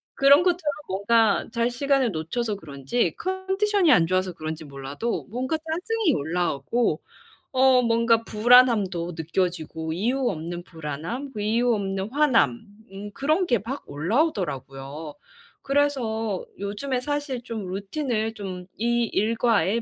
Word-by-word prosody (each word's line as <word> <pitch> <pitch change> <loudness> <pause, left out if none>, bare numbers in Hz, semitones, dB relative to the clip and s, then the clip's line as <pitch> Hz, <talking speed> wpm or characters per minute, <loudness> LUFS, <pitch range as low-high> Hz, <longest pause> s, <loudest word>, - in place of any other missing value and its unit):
그런 280 +4 +6
것처럼 350 -5 +1
뭔가 205 +3 +2
잘 235 +1 +1
시간을 270 -1 +1
놓쳐서 205 +7 -2
그런지 150 - -2
컨디션이 380 -1 +1
안 165 - +6
좋아서 185 +1 0
그런지 155 -1 -6
몰라도 140 +11 -4
뭔가 260 +6 -1
짜증이 340 +4 -1
올라오고 160 - 0 0.5
어 260 -1 +5
뭔가 230 0 +3
불안함도 215 -7 +4
느껴지고 160 -1 -2
이유 245 +8 0
없는 175 +1 -5
불안함, 165 - -6
그 210 - -4
이유 235 +3 +2
없는 195 0 -3
화남 265 -4 +3 0.3
음 200 +2 -8
그런 310 - +1
게 240 -8 +2
막 255 +8 -6
올라오더라고요. 150 - -2 0.5
그래서 240 -8 0 0.2
요즘에 210 +6 -2
사실 290 -2 -3
좀 225 -5 -5
루틴을 220 +2 -2
좀 185 -4 -6
이 235 +2 +1
일과에 225 -2 +1
225 Hz, 285 characters per minute, -25 LUFS, 180-265 Hz, 0.5 s, 그런